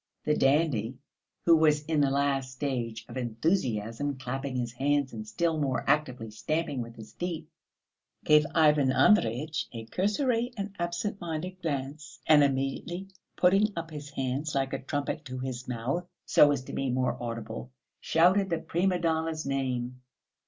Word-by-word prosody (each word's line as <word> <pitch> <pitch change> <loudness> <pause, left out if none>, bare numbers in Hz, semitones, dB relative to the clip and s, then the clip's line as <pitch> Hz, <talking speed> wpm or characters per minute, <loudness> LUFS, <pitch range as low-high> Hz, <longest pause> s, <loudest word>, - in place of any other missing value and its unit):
The 150 - +3
dandy, 135 -5 +2 0.5
who 170 - +7
was 150 -2 +3
in 155 -2 +1
the 140 - +3
last 135 -1 0
stage 120 -4 -3
of 120 - -8
enthusiasm, 120 - -1
clapping 135 +1 -4
his 120 -2 -2
hands 140 +2 0
and 110 -1 -6
still 160 +9 0
more 135 -3 -1
actively 125 -6 +1
stamping 150 +4 -2
with 115 0 -8
his 110 -2 -12
feet, 170 -3 -4 0.8
gave 150 0 +5
Ivan 150 -4 +5
Andreyitch 150 - +3
a 115 -2 -7
cursory 230 - 0
and 200 0 -4
absent 175 +4 -2
minded 175 +3 -4
glance, 145 -1 -4
and 150 -2 +7
immediately 140 +7 -1 0.3
putting 195 +4 +4
up 165 -1 -5
his 150 -1 -7
hands 140 +2 -2
like 135 -1 0
a - - -2
trumpet 145 +1 -3
to 130 -1 -6
his 130 -1 -5
mouth, 125 +9 -2 0.2
so 145 - +6
as 140 -3 -1
to - - -9
be 135 - -1
more 125 0 +1
audible, 115 - -5 0.3
shouted 185 +4 +3
the 170 - +1
prima 180 +3 0
donna's 160 -2 -1
name. 125 -2 -2
145 Hz, 155 wpm, -29 LUFS, 125-165 Hz, 0.8 s, who